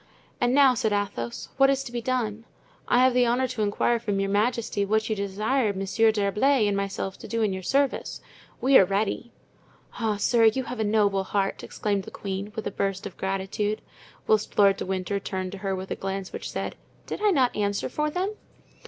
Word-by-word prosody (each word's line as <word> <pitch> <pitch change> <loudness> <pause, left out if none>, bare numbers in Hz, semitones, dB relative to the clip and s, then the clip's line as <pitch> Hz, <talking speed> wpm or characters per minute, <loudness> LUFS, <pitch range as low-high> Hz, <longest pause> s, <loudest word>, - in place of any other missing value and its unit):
"And 245 +1 +3
now," 275 -2 +6
said 225 -2 0
Athos, 195 -13 -3
"what 270 0 +6
is 275 0 +1
to 240 - -8
be 240 -1 -3
done? 230 -3 -2 0.4
I 245 +1 +4
have 260 -1 +4
the 250 -1 +4
honor 250 +2 +2
to 235 -3 -3
inquire 215 +3 +1
from 205 -4 -1
your 195 0 0
majesty 215 0 0
what 220 +2 +1
you - - +1
desire 210 +4 0
Monsieur 200 +4 +2
d'Herblay 215 +5 +2
and 205 - +1
myself 195 -1 -3
to - - -9
do 230 -1 -1
in 205 -3 +1
your 190 - -4
service. 275 +7 0 0.4
We 265 +1 +6
are - - +7
ready." 205 +5 -1 0.7
"Ah, 220 -2 +1
sir, 230 +2 +3
you 225 +4 +3
have 250 -1 -6
a - - +2
noble 205 -2 +2
heart!" 195 0 -1
exclaimed 200 -2 -2
the - - -8
queen, 195 +1 -5
with 220 - -4
a - - -2
burst 195 -1 -2
of 200 - -7
gratitude; 195 +2 -2 0.4
whilst 215 -1 +1
Lord 200 -1 +5
de - - -5
Winter 190 +1 -1
turned 185 -2 -4
to 200 - -8
her 195 -1 -2
with 190 +1 -7
a - - 0
glance 195 0 -4
which - - -5
said, - - -4 0.3
"Did - - -5
I 425 - +4
not 265 -9 +2
answer 205 -1 -1
for 300 +4 -1
them?" 370 +6 -2
210 Hz, 210 wpm, -26 LUFS, 195-245 Hz, 0.7 s, are